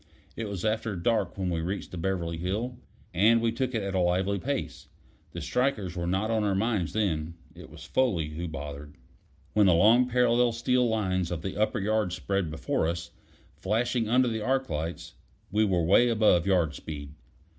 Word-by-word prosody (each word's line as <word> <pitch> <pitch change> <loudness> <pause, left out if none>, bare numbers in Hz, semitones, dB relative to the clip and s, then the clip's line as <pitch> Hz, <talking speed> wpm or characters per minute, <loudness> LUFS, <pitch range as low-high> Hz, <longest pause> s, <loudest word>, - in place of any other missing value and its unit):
It 110 -2 -4
was 100 0 -4
after 110 -1 -1
dark 100 +1 0
when 95 -2 -1
we 85 -1 -1
reached 95 +5 -4
the 90 - -6
Beverly 85 -2 -2
Hill, 110 +8 -3 0.3
and 110 +7 +5
we 115 0 +1
took 130 +2 -2
it 110 - -1
at 100 0 -3
a 95 - +1
lively 95 +3 +1
pace. 140 +5 -4 0.4
The - - -6
strikers 110 -9 -1
were 85 -1 -3
not 95 +5 0
on 110 -1 +1
our 100 -2 +1
minds 100 -6 0
then; 85 -6 -1 0.2
it 90 +1 -12
was 75 +1 -12
Foley 90 -6 0
who 85 +3 -5
bothered. 75 -1 -7 0.6
When 105 -2 +4
the 90 - +5
long 115 +8 +5
parallel 120 -1 +3
steel 125 +1 +1
lines 95 -5 0
of 85 -3 -4
the 95 - -4
upper 105 +2 +1
yards 105 -2 0
spread 95 -2 -1
before 80 0 -1
us, 85 0 -4 0.4
flashing 115 +2 -1
under 125 +2 +4
the 110 -2 -2
arc 130 +4 0
lights, 80 +3 -4 0.4
we 110 +2 +3
were 90 -4 +1
away 100 +9 +4
above 105 -6 +3
yard 85 -6 +2
speed. 70 -2 -8
100 Hz, 190 wpm, -28 LUFS, 85-115 Hz, 0.6 s, and